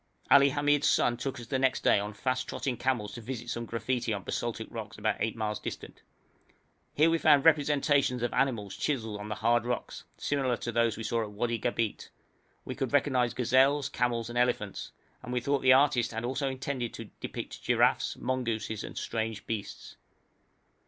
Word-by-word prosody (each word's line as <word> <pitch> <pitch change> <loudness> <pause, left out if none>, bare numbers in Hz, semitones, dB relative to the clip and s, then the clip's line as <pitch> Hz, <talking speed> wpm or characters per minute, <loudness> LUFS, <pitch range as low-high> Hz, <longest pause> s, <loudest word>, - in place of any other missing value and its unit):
Ali 140 0 +8
Hamid's 145 +1 +2
son 120 - +3
took 125 +1 -4
us 120 - -8
the 130 +4 -1
next 130 0 +1
day - - +5
on 105 +1 -4
fast 130 +2 -1
trotting 130 -3 -2
camels 120 -5 -1
to 120 - -7
visit 120 0 -5
some 120 0 -4
graffiti 120 0 -2
on 100 -2 -2
basaltic 115 +1 -3
rocks 110 -3 -7
about 105 0 0
eight 110 +1 -1
miles 105 -2 -2
distant. - - -7 0.9
Here 160 +3 +4
we 165 - +2
found 145 -2 +5
representations 145 -4 +3
of 120 - -1
animals 110 -8 0
chiselled 110 -4 -2
on 105 +1 -7
the 105 - -2
hard 120 +2 +2
rocks, 125 0 -4
similar 135 -4 0
to 120 - -4
those 115 -2 +1
we 115 - -5
saw 115 0 0
in 105 -1 -8
Wadi 115 +1 -1
Gabeit; 115 -1 -2 0.6
we - - -4
could 135 -1 -3
recognise 130 -4 +2
gazelles, 130 +3 +3
camels, 120 -2 -1
and 120 +1 -2
elephants, 120 -5 -1 0.3
and 125 - -7
we 125 - +1
thought 140 +3 0
the 130 0 +6
artist 130 -4 +3
also 125 +4 -2
had 135 - -1
intended 130 -2 -4
to - - -9
depict - - -6
giraffes, - - +2
mongooses, 115 -4 -2
and - - -7
other - - -3
strange 110 -2 -3
beasts. 105 -3 -6
120 Hz, 185 wpm, -29 LUFS, 115-135 Hz, 0.9 s, Ali